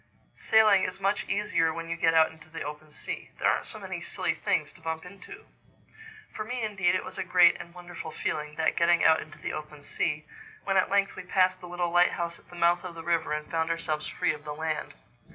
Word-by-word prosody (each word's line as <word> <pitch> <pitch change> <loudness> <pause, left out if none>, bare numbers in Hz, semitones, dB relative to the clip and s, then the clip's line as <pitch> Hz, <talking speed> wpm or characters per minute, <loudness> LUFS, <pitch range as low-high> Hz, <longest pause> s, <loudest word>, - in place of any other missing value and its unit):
"Sailing 215 -3 +5
is 185 - -3
much 195 +1 0
easier 200 -6 +1
when 165 +1 -6
you 165 - -2
get 165 -1 +2
out 160 0 +5
into 160 0 -17
the 160 +1 -6
open 150 +1 -8
sea. - - -6
There - - +1
aren't - - +1
so - - -8
many - - -6
silly - - -2
things - - -1
to - - -18
bump 160 +1 -4
into." 300 - -12 0.9
For 215 - -4
me 245 +2 -4
indeed 195 -4 +1
it 185 - -1
was - - -7
a - - 0
great 175 -1 +6
and 170 - -12
wonderful 175 -2 -8
feeling, 150 -1 -3
that 160 - +1
getting 170 0 +4
out 160 0 +6
into 155 - -11
the - - -5
open 150 -1 -7
sea, 150 +1 -2 0.4
when 195 - 0
at 190 - +3
length 200 0 +2
we - - -6
passed 185 0 +2
the 180 - -8
little 175 -1 -1
lighthouse 175 -1 +2
at - - -25
the 175 - -12
mouth 175 +1 +3
of 180 -2 -7
the 165 - -7
river 170 -2 0
and 150 0 -3
found 165 0 0
ourselves 160 -2 -2
free - - 0
of 150 -1 -10
the 150 -1 -5
land. 160 - -3
170 Hz, 230 wpm, -28 LUFS, 160-185 Hz, 0.9 s, great